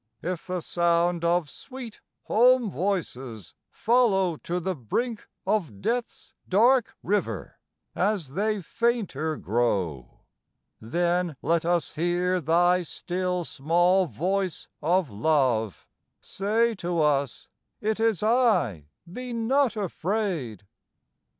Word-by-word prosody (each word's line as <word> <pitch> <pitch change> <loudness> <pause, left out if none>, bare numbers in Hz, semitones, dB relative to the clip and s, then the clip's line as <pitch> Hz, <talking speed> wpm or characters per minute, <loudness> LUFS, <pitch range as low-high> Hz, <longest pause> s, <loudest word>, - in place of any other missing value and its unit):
If 180 0 -4
the 180 -1 -2
sound 170 0 +1
Of 170 -1 +2
sweet 250 - -10 0.2
home 245 -1 +4
voices 135 - -3 0.2
follow 205 -7 +2
to 175 +4 -3
the 185 +2 -2
brink 210 - -3 0.2
Of 165 - -1
death's 240 - -3 0.2
dark 235 +5 +4
river, 180 - -2 0.4
as 185 -8 -1
they 210 +2 -1
fainter 220 -7 -1
grow, 95 - -1 0.6
Then 175 +6 0
let 165 0 +1
us 175 -1 0
hear 175 +2 0
Thy 175 +4 +3
still 180 +1 -2
small 175 +6 +2
voice 180 - -2
of 170 - +1
love; 115 - +1 0.3
Say 225 +4 0
to 175 -1 -2
us, 140 -4 0 0.3
"It 215 +1 -1
is 225 -4 +1
I 215 - +2 0.2
be 250 +7 -6
not 240 +2 +1
afraid." 180 - -2
180 Hz, 105 wpm, -26 LUFS, 155-210 Hz, 0.6 s, home